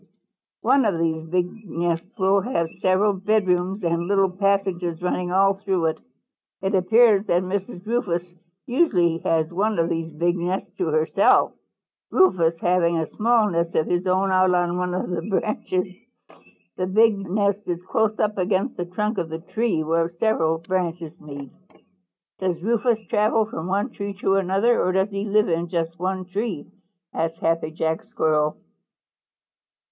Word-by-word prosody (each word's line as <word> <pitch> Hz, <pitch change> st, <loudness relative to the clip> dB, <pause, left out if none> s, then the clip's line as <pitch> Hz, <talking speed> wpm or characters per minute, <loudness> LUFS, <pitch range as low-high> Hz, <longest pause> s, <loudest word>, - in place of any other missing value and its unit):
"One 275 Hz, 0 st, +4 dB
of 200 Hz, -5 st, +1 dB
these 160 Hz, -1 st, -1 dB
big 180 Hz, +5 st, -2 dB
nests 175 Hz, +6 st, -3 dB
will 195 Hz, 0 st, +3 dB
have 170 Hz, -8 st, -1 dB
several 190 Hz, +3 st, +2 dB
bedrooms 195 Hz, -1 st, 0 dB
and 170 Hz, 0 st, 0 dB
little 195 Hz, -1 st, +2 dB
passages 190 Hz, -3 st, 0 dB
running 180 Hz, 0 st, -2 dB
all 195 Hz, +1 st, +4 dB
through 195 Hz, -3 st, -1 dB
it. 160 Hz, -, -1 dB, 0.6 s
It 190 Hz, +2 st, 0 dB
appears 210 Hz, +2 st, +4 dB
that 175 Hz, +1 st, +2 dB
Mrs. 185 Hz, +1 st, -4 dB
Rufous 210 Hz, -7 st, -1 dB, 0.4 s
usually 195 Hz, -, +2 dB
has 160 Hz, 0 st, 0 dB
one 210 Hz, +4 st, 0 dB
of 165 Hz, 0 st, +1 dB
these 165 Hz, -1 st, -3 dB
big 170 Hz, +3 st, 0 dB
nests 180 Hz, +1 st, -3 dB
to 180 Hz, -, 0 dB
herself, 155 Hz, 0 st, +3 dB, 0.6 s
Rufous 170 Hz, -, +3 dB
having 170 Hz, -1 st, +2 dB
a 160 Hz, -, 0 dB
small 225 Hz, -2 st, +2 dB
nest 170 Hz, 0 st, -1 dB
of 155 Hz, -, +2 dB
his 180 Hz, +1 st, -1 dB
own 190 Hz, +1 st, +2 dB
out 185 Hz, 0 st, +4 dB
on 175 Hz, 0 st, +1 dB
one 180 Hz, 0 st, -1 dB
of 185 Hz, -, -2 dB
the 175 Hz, -2 st, -2 dB
branches. 185 Hz, -1 st, -2 dB, 0.8 s
The 185 Hz, -, -1 dB
big 215 Hz, +1 st, +3 dB
nest 200 Hz, +1 st, 0 dB
is 175 Hz, 0 st, -3 dB
close 215 Hz, +3 st, 0 dB
up 210 Hz, -1 st, 0 dB
against 190 Hz, +6 st, 0 dB
the 175 Hz, -, -2 dB
trunk 210 Hz, +4 st, -2 dB
of 170 Hz, -2 st, -3 dB
the 160 Hz, -, -4 dB
tree 180 Hz, 0 st, -1 dB
where 165 Hz, +1 st, +1 dB
several 170 Hz, -3 st, +1 dB
branches 170 Hz, -1 st, -3 dB
meet." 140 Hz, -2 st, -9 dB, 0.9 s
"Does 185 Hz, -3 st, -1 dB
Rufous 225 Hz, 0 st, +1 dB
travel 215 Hz, +2 st, +2 dB
from 175 Hz, -6 st, -6 dB
one 195 Hz, +2 st, -1 dB
tree 200 Hz, -1 st, -5 dB
to 195 Hz, 0 st, 0 dB
another, 195 Hz, +5 st, +2 dB
or 185 Hz, -, +1 dB
does 190 Hz, +2 st, +1 dB
he 200 Hz, +1 st, -3 dB
live 210 Hz, +1 st, +2 dB
in 170 Hz, 0 st, -1 dB
just 165 Hz, -1 st, -3 dB
one 185 Hz, +1 st, -2 dB
tree?" 195 Hz, -3 st, -3 dB, 0.5 s
asked 165 Hz, 0 st, -2 dB
Happy 165 Hz, -1 st, 0 dB
Jack 160 Hz, +2 st, -2 dB
Squirrel. 155 Hz, -7 st, 0 dB
185 Hz, 160 wpm, -23 LUFS, 170-205 Hz, 0.9 s, One